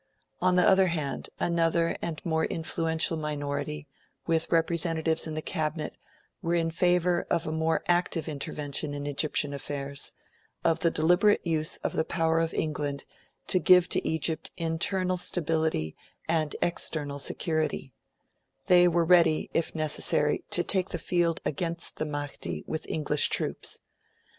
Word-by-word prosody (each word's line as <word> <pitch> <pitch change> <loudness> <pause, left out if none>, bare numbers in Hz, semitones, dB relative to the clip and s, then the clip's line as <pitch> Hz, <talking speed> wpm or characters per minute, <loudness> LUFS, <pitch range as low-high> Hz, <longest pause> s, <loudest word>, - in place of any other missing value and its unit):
On 185 0 +3
the 180 - +4
other 190 0 +5
hand, 155 -5 -3
another 170 0 +1
and 165 -2 -3
a - - -8
more 160 -1 +1
influential 165 0 0
minority, 150 0 -3 0.4
with 165 -1 0
representatives 165 -1 +1
in 155 - -5
the 155 - -4
Cabinet, 155 -3 -2 0.5
were 170 -1 0
in 165 -1 +1
favour 175 +1 +2
of 170 -1 0
a 155 - -3
more 160 0 0
active 175 -2 +1
intervention 145 0 -2
in 145 0 -5
Egyptian 145 0 0
affairs 140 0 -4 0.5
of 165 -1 +2
the 170 - +3
deliberate 175 +7 +3
use 160 -2 +1
of - - -1
the 160 - +1
power 165 -1 +1
of 165 0 0
England 145 -2 -2 0.4
to 185 - +2
give 180 +1 +6
to - - 0
Egypt 160 0 0
internal 180 +3 0
stability 160 - 0 0.3
and 160 -2 0
external 145 -4 -1
security; 155 -3 -2 0.7
they 180 0 +6
were 170 -1 +2
ready, 165 -2 +4
if 165 - -1
necessary, 150 -1 +1
to 175 - +2
take 190 0 +1
the - - -3
field 170 0 0
against 170 +3 -3
the 155 - -2
Mahdi 145 -1 -5
with 160 - -5
English 150 -1 +2
troops. - - -1
160 Hz, 145 wpm, -28 LUFS, 150-170 Hz, 0.7 s, give